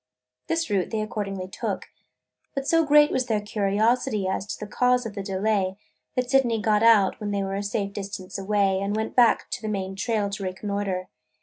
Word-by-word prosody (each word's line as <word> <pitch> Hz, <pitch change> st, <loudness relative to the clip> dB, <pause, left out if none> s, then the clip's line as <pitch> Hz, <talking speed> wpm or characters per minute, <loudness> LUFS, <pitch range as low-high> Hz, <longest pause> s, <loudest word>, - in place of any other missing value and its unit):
This 330 Hz, 0 st, 0 dB
route 195 Hz, -3 st, +1 dB
they 220 Hz, -, -2 dB
accordingly 200 Hz, -3 st, -4 dB
took. -, -, -4 dB, 0.7 s
But 275 Hz, 0 st, -3 dB
so 330 Hz, 0 st, +4 dB
great 295 Hz, 0 st, +5 dB
was 260 Hz, -1 st, 0 dB
their 220 Hz, -3 st, +1 dB
curiosity 210 Hz, +1 st, +1 dB
as 190 Hz, +1 st, -2 dB
to -, -, -5 dB
the 210 Hz, 0 st, -7 dB
cause 250 Hz, 0 st, +2 dB
of 220 Hz, -, -5 dB
the 200 Hz, -, -4 dB
delay, 195 Hz, 0 st, 0 dB, 0.4 s
that 250 Hz, -1 st, 0 dB
Sydney 245 Hz, -5 st, +3 dB
got 210 Hz, 0 st, +2 dB
out, 220 Hz, -4 st, +5 dB
when 210 Hz, -, -3 dB
they 200 Hz, -1 st, -1 dB
were 195 Hz, 0 st, -3 dB
a 200 Hz, -, -1 dB
safe 200 Hz, -1 st, -2 dB
distance 195 Hz, -2 st, -6 dB
away, 195 Hz, -1 st, +1 dB
and 200 Hz, +1 st, -1 dB
went 220 Hz, 0 st, -3 dB
back 240 Hz, -2 st, +5 dB
on 245 Hz, -, -5 dB
the 220 Hz, -, -4 dB
main 195 Hz, -2 st, -3 dB
trail 210 Hz, 0 st, 0 dB
to 200 Hz, 0 st, -5 dB
reconnoiter. 190 Hz, 0 st, -3 dB
205 Hz, 200 wpm, -25 LUFS, 195-230 Hz, 0.7 s, great